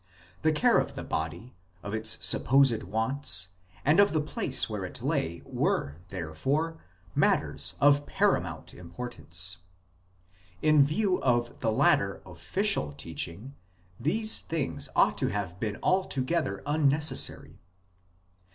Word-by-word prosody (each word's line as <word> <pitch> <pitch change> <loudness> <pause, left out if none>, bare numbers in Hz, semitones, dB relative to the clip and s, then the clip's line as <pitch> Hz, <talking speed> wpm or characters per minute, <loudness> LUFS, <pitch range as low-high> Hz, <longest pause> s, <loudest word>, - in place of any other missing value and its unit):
The 155 - +3
care 150 - +3
of - - -3
the - - -5
body, 85 +10 -4 0.3
of 100 - -6
its 110 0 +1
supposed 130 -3 +4
wants, 110 -2 +1 0.4
and 150 +7 +4
of 200 -3 +5
the 155 - +2
place 150 - +1
where - - -4
it - - -6
lay 85 +1 -2
were, 70 +2 -1
therefore, 135 - -2 0.3
matters 75 +4 +1
of 145 0 +4
paramount - - 0
importance. 90 -1 -3 1.1
In 155 -2 +6
view 180 +6 0
of 120 -2 0
the 110 - 0
later 100 -2 +2
" - - -29
official 95 - 0
" - - -19
teaching 85 - -5 0.5
these 215 - +1
things 85 - -3
ought - - +3
to - - +1
have 95 -3 -4
been 105 -2 -3
altogether 165 - 0
unneces 150 0 +2
sary. - - -3
120 Hz, 130 wpm, -28 LUFS, 90-150 Hz, 1.1 s, In